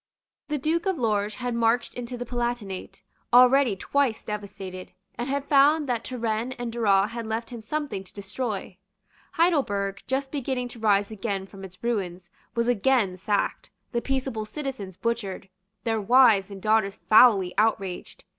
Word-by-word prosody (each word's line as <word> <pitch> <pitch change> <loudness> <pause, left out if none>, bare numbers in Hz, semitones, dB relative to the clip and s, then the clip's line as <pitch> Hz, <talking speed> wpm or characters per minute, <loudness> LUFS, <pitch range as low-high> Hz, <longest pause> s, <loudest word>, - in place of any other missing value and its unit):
The 300 - -1
Duke 325 +6 0
of 380 -3 +1
Lorges 210 -4 0
had 245 -1 -3
marched 230 +1 +1
into 245 0 -6
the 245 - -5
Palatinate, 240 -5 -4 0.3
already 250 -1 +6
twice 265 +2 0
devastated, 195 -3 -7 0.2
and 240 +3 -4
had 280 0 -1
found 290 +2 +4
that 240 -2 -1
Turenne 235 0 -2
and 245 -2 -5
Duras 210 -3 +2
had 230 -1 -5
left 225 +2 -3
him 235 -2 -7
something 285 -3 -3
to - - -13
destroy. 200 -2 -5 0.5
Heidelberg, 205 - +1
just 270 +1 -1
beginning 260 -3 -2
to 235 - -11
rise 205 -1 +2
again 200 -2 -3
from 195 +1 -12
its 185 +1 -12
ruins, 185 -6 -3 0.2
was 235 0 +1
again 240 -4 +2
sacked, 200 +2 -1 0.2
the 235 - -1
peaceable 260 -5 -2
citizens 245 - -6
butchered, 210 -5 -3 0.3
their 225 -2 0
wives 220 -3 +5
and 195 -2 -10
daughters 215 -2 +2
foully 205 -5 +6
outraged. 215 - -1
230 Hz, 155 wpm, -26 LUFS, 200-255 Hz, 0.5 s, already